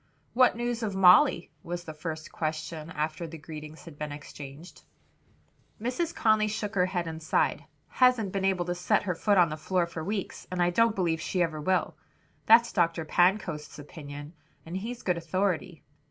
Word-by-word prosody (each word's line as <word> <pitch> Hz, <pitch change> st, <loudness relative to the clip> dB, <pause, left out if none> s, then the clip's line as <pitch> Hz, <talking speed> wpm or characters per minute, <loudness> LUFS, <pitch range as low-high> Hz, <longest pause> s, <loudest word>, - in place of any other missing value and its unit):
"What 255 Hz, 0 st, +5 dB
news 240 Hz, -1 st, -2 dB
of 210 Hz, -4 st, -2 dB
Molly?" 180 Hz, -3 st, +5 dB
was 175 Hz, +1 st, -5 dB
the 160 Hz, -, -8 dB
first 155 Hz, 0 st, -6 dB
question 155 Hz, 0 st, -4 dB
after 155 Hz, +2 st, -3 dB
the 165 Hz, +1 st, -9 dB
greetings 155 Hz, +1 st, -10 dB
had 160 Hz, -4 st, -12 dB
been 150 Hz, -1 st, -4 dB
exchanged. 145 Hz, +2 st, -10 dB, 1.0 s
Mrs. 255 Hz, +9 st, -1 dB
Conly 215 Hz, -1 st, +3 dB
shook 210 Hz, 0 st, -3 dB
her 180 Hz, -3 st, +2 dB
head 180 Hz, -2 st, -2 dB
and 160 Hz, -1 st, -6 dB
sighed, 155 Hz, -, 0 dB, 0.2 s
"Hasn't 250 Hz, -6 st, +3 dB
been 195 Hz, 0 st, -2 dB
able 190 Hz, -2 st, +1 dB
to 175 Hz, -, -1 dB
set 180 Hz, 0 st, +1 dB
her 185 Hz, -2 st, -1 dB
foot 200 Hz, +4 st, +2 dB
on 175 Hz, -3 st, +5 dB
the 155 Hz, -, -4 dB
floor 180 Hz, +3 st, 0 dB
for 170 Hz, -1 st, -6 dB
weeks, 200 Hz, +2 st, -4 dB
and 185 Hz, -, -4 dB
I 175 Hz, 0 st, +3 dB
don't 230 Hz, +4 st, +3 dB
believe 165 Hz, -4 st, 0 dB
she 180 Hz, +2 st, 0 dB
ever 155 Hz, -2 st, -3 dB
will. 185 Hz, +4 st, 0 dB, 0.5 s
That's 230 Hz, +1 st, +6 dB
Dr. 165 Hz, -3 st, +1 dB
Pancoast's 175 Hz, -3 st, +1 dB
opinion, 145 Hz, 0 st, -9 dB, 0.3 s
and 165 Hz, +2 st, -7 dB
he's 230 Hz, +5 st, -5 dB
good 180 Hz, -2 st, +1 dB
authority. 175 Hz, -1 st, -2 dB
175 Hz, 180 wpm, -28 LUFS, 155-200 Hz, 1.0 s, That's